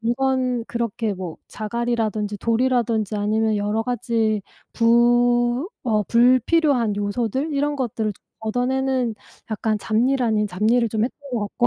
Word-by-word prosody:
물건 250 Hz, 0 st, 0 dB
그렇게 230 Hz, -2 st, -2 dB
뭐 180 Hz, -4 st, -6 dB
자갈이라든지 215 Hz, -2 st, -2 dB
돌이라든지 230 Hz, -3 st, +1 dB
아니면 215 Hz, +1 st, +1 dB
여러 210 Hz, +2 st, 0 dB
가지 225 Hz, -3 st, 0 dB, 0.3 s
부 240 Hz, +4 st, +3 dB, 0.2 s
어 215 Hz, -3 st, +2 dB
불필요한 250 Hz, -, +3 dB
요소들 235 Hz, +8 st, -2 dB
이런 290 Hz, +1 st, 0 dB
것들을 225 Hz, -5 st, -2 dB, 0.3 s
얻어내는 250 Hz, +1 st, 0 dB, 0.4 s
약간 215 Hz, 0 st, -1 dB
잡일 245 Hz, +6 st, +1 dB
아닌 215 Hz, -2 st, +1 dB
잡일을 220 Hz, +5 st, +1 dB
좀 220 Hz, 0 st, +1 dB
했던 265 Hz, -, -5 dB
것 215 Hz, -4 st, -2 dB
같고. 240 Hz, +2 st, +1 dB
235 Hz, 295 characters per minute, -22 LUFS, 215-250 Hz, 0.4 s, 부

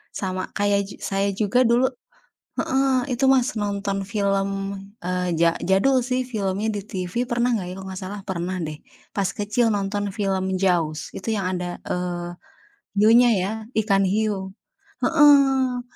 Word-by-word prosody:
Sama 185 Hz, -1 st, -3 dB
kayak 200 Hz, -1 st, +1 dB
jug -, -, -11 dB
saya 195 Hz, +1 st, 0 dB
juga 215 Hz, +5 st, +2 dB
dulu 245 Hz, +2 st, +4 dB, 0.7 s
heeh, 265 Hz, -1 st, +2 dB
itu 270 Hz, -, -1 dB
Mas, 265 Hz, +1 st, +3 dB
nonton 200 Hz, -1 st, -2 dB
film, 200 Hz, -1 st, 0 dB, 0.5 s
eee, 180 Hz, 0 st, -1 dB
ja 170 Hz, 0 st, +4 dB
jadul, 245 Hz, +8 st, +3 dB
sih, 255 Hz, +1 st, 0 dB
filmnya 205 Hz, -2 st, -2 dB
di 200 Hz, -, -3 dB
TV, 185 Hz, +2 st, -3 dB
pernah 240 Hz, +1 st, +1 dB
enggak, 190 Hz, -5 st, -2 dB
ya, -, -, -5 dB
kalau 190 Hz, -, -8 dB
enggak 190 Hz, 0 st, -6 dB
salah 200 Hz, +2 st, -5 dB
pernah, 185 Hz, 0 st, -3 dB
deh, 155 Hz, -1 st, -5 dB, 0.4 s
pas 200 Hz, -2 st, +1 dB
kecil 210 Hz, +3 st, +1 dB
nonton 205 Hz, 0 st, -2 dB
film 190 Hz, -2 st, -1 dB
Jaws. 160 Hz, -5 st, +1 dB
Itu 220 Hz, +4 st, -3 dB
yang 195 Hz, -3 st, -1 dB
ada, 175 Hz, 0 st, -5 dB
eee, 175 Hz, -1 st, -3 dB, 0.7 s
hiunya, 235 Hz, +3 st, +6 dB
ya, 190 Hz, +1 st, 0 dB, 0.3 s
ikan 195 Hz, -2 st, +2 dB
hiu. 195 Hz, -1 st, -1 dB, 0.5 s
Heeh. 270 Hz, -4 st, +4 dB
200 Hz, 150 wpm, -23 LUFS, 185-235 Hz, 0.7 s, hiunya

